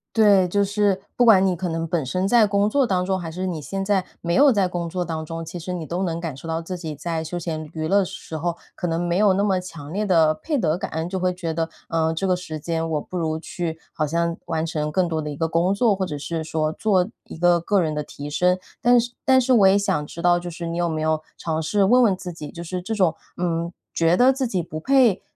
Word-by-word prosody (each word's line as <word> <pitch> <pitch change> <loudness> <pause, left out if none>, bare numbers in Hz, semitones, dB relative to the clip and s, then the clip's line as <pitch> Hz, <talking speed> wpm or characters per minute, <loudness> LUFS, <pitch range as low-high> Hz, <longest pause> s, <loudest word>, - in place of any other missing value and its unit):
对， 205 -4 +5
就 200 +3 +1
是 200 -1 +1 0.2
不 245 - +3
管 195 -5 +6
你 185 -2 +2
可 180 +1 -3
能 165 0 -2
本 170 -2 0
身 185 +9 -1
在 225 0 +5
工 200 +1 +2
作 265 +2 +2
当 180 -2 +1
中， 190 0 0
还 170 -2 -5
是 180 +3 -4
你 170 -5 -3
现 195 +7 -4
在 195 -2 +2 0.2
没 170 0 -1
有 280 +7 +6
在 200 -5 +2
工 175 -1 -3
作 180 +1 -2
当 160 -1 -4
中， 165 +1 -6
其 175 +2 -7
实 175 +2 -6
你 170 -3 -4
都 175 +4 -3
能 170 -3 -1
感 165 -5 -4
受 140 - -10
到 165 0 -1
自 180 +2 -5
己 160 -4 -6
在 160 +2 -3
休 175 +2 -5
闲 160 -2 -4
娱 155 -1 -3
乐 200 +2 +4
时 185 -3 -8
候， 170 +2 -2 0.2
可 180 - -3
能 165 0 -1
没 175 0 0
有 200 0 +4
那 200 +2 +1
么 190 -3 +2
强 165 -3 -9
烈 210 +2 -1
的 165 -5 +4
配 300 - -2
得 165 - +1
感。 - - -4 0.2
就 190 0 -2
会 185 0 +1
觉 170 -3 -4
得， 165 0 -1 0.2
呃， 160 -1 +1
这 195 - -1
个 185 -1 +3
时 160 -4 -6
间 165 +1 -2
我 150 -2 0
不 185 - -10
如 160 -2 -1
去 165 0 -4 0.2
好 155 - -1
像 170 +2 0
完 160 -1 -1
成 150 -2 -2
更 180 +3 +1
多 160 -1 -2
的 150 - -4
一 145 - -5
个 160 +3 0
工 170 +3 +1
作， 210 0 +3
或 190 - -2
者 150 -4 -5
是 160 +2 -4
说 155 -1 -1
做 185 +1 +1 0.2
一 - - -10
个 175 0 +4
个 195 +4 +1
人 155 -2 -1
的 150 - -2
提 145 0 -8
升。 180 +4 +2 0.2
但 245 0 +5
是 240 +1 -2
但 260 -1 +6
是 260 0 +2
我 205 -5 +6
也 195 - +5
想 150 -7 0
知 170 - -8
道 175 0 +4
就 175 0 -6
是 170 +1 -6
你 165 - -3
有 175 0 +1
没 155 -1 -2
有 155 0 +1 0.2
尝 160 -1 -2
试 200 +6 +1
问 245 +6 +5
问 205 -5 +4
自 180 -1 -6
己， 150 -3 -8
就 170 - -8
是 180 +1 -4
这 220 +5 -3
种， 185 -6 +2 0.2
嗯， 170 -1 -1 0.2
觉 165 +1 +3
得 255 +2 +6
自 265 -1 -1
己 190 -6 -1
不 155 -1 -6
配 245 -1 +3
175 Hz, 295 characters per minute, -23 LUFS, 160-195 Hz, 0.2 s, 管